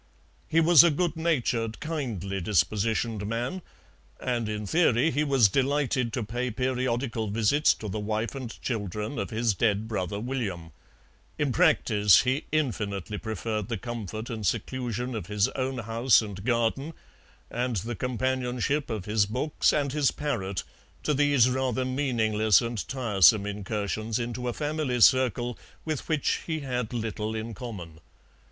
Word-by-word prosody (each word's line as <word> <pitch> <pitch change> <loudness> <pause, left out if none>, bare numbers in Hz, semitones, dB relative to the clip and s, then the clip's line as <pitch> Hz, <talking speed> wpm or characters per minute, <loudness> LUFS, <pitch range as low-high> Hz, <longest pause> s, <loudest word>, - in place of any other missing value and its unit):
He 165 - +3
was 165 0 +8
a 170 - +5
good 170 +2 0
natured, 125 -9 0
kindly 110 - -3
dispositioned 105 +4 0
man, 120 - -3 0.6
and 120 -3 -1
in 105 0 -3
theory 155 - +3
he 150 +2 +1
was 135 -6 +4
delighted 130 +1 0
to 120 - -1
pay 120 +4 -3
periodical 125 -1 -1
visits 115 +8 +3
to 110 - -7
the 105 +2 -3
wife 110 +2 -2
and 130 -4 -7
children 105 +1 -3
of 100 - -3
his 115 -1 +1
dead 105 +2 +1
brother 100 -2 -3
William; 105 -9 -4 0.7
in 145 -3 0
practice, 110 - +4
he 130 +3 -1
infinitely 105 - -2
preferred 110 -1 -3
the 115 - -1
comfort 110 0 -6
and 110 -4 -2
seclusion 125 +4 -2
of 110 - -5
his 105 -1 +1
own 130 0 -3
house 115 +2 +3
and 100 -3 -6
garden, 120 +6 0 0.6
and 120 0 -1
the 115 +5 -3
companionship 130 +4 -1
of 110 -5 -4
his 105 -1 +2
books 130 +8 +1
and 140 -3 0
his 145 -3 +3
parrot 105 -11 -3 0.4
to 150 - +1
these 140 -3 +4
rather 130 0 0
meaningless 110 -6 +2
and 115 -3 -3
tiresome 105 -6 +4
incursions 105 +1 -3
into 120 +1 -3
a 120 - -1
family 150 -4 -2
circle 120 -1 +3 0.3
with 155 -1 -4
which 155 -4 +1
he 160 -2 -2
had 125 -4 -3
little 110 -2 -3
in 110 +1 -4
common. 95 -8 -8
120 Hz, 145 wpm, -27 LUFS, 105-130 Hz, 0.7 s, was